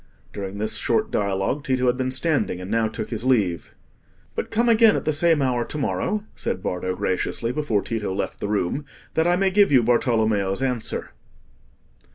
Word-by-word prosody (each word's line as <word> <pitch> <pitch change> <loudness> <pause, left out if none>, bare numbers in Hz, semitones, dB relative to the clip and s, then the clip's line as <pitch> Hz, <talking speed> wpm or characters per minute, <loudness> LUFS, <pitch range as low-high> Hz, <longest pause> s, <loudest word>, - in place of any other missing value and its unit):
'" - - -32
During 100 0 -5
this 110 +1 0
short 220 0 0
dialogue, 100 +7 -1
Tito 130 -2 0
had 125 0 +3
been 130 0 -1
standing, 130 - 0
and 90 +2 -7
now 115 0 +2
took 110 - -6
his 115 -1 -3
leave. 105 -10 0 0.6
"But - - -4
come 235 +2 +1
again 225 -2 +6
at - - -3
the 155 - +1
same 160 -1 +3
hour 125 -2 +1
to 150 - -5
morrow," 210 +8 -1
said 95 - -3
Bardo, 90 0 -2
graciously, 95 +6 -1
before 125 -7 0
Tito 110 -4 -3
left 95 +1 -3
the - - -3
room, 105 +7 -1 0.3
"that 160 +1 +2
I 175 - +4
may 190 +1 +2
give 200 -2 +4
you 130 -4 +5
Bartolommeo's 110 -3 +1
answer." 125 -4 -2
120 Hz, 190 wpm, -23 LUFS, 100-150 Hz, 0.6 s, again